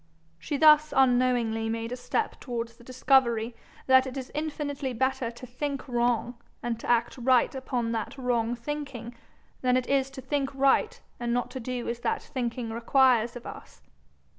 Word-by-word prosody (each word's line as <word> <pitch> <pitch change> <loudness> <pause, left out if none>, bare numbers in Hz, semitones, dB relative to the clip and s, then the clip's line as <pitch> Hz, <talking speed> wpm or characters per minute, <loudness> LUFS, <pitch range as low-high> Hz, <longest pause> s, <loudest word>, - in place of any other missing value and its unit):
She 285 - -3
thus 305 0 +6
unknowingly 245 -4 +3
made 230 +1 -3
a - - -2
step 345 - -2
towards 235 -2 -5
the 240 - -18
discovery 245 -2 +2 0.3
that 260 0 +5
it 260 +1 -6
is 260 -1 -6
infinitely 290 -3 -3
better 260 0 0
to 235 +2 -10
think 275 +3 -4
wrong 240 -1 0 0.2
and 235 -1 -2
to - - -7
act 240 +2 +1
right 250 0 +3
upon 250 -3 -2
that 225 +3 -3
wrong 240 -2 0
thinking, 255 -2 -6 0.5
than 250 0 +3
it 255 - -1
is 270 -1 +1
to 270 -1 -9
think 275 -2 -2
right 275 - +2 0.2
and 240 -1 -1
not 245 - -1
to 260 - -5
do 250 0 -4
as 235 0 -3
that - - -1
thinking 240 -2 -3
requires 240 0 +3
of 240 - -9
us. - - -11
250 Hz, 170 wpm, -27 LUFS, 235-270 Hz, 0.5 s, thus